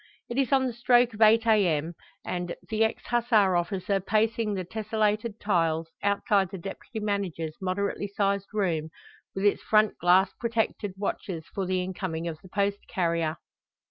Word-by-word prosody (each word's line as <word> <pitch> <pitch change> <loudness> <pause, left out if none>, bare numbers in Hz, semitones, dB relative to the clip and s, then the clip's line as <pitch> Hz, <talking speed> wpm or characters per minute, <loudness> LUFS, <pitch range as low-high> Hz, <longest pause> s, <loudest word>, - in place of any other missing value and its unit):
It 240 +3 -1
is 265 -3 +1
on 265 -1 +4
the 250 - -2
stroke 240 0 +3
of 210 - -9
8 225 +1 +6
a.m., 175 -8 +2 0.3
and, 175 -1 -3
the 220 0 +2
ex 220 - -1
Hussar 225 -6 +3
officer 185 +3 0
pacing 215 +2 0
the 185 - -2
tesselated 215 +2 -1
tiles, 165 -5 0
outside 200 -1 +2
the 195 - -6
deputy 195 +5 -7
manager's 195 -7 -2
moderately 200 +2 -1
sized 200 -1 0
room 170 -7 -1 0.5
with 195 +1 -1
its 205 - +3
front 215 -1 +2
glass 185 +3 +4
protected, 225 -4 -1
watches 185 -4 -4
for 195 -2 -2
the 185 0 0
incoming 180 -3 -4
of 160 -2 -6
the 185 - -15
post 200 +1 0
carrier. 165 -3 0
200 Hz, 160 wpm, -27 LUFS, 180-220 Hz, 0.5 s, 8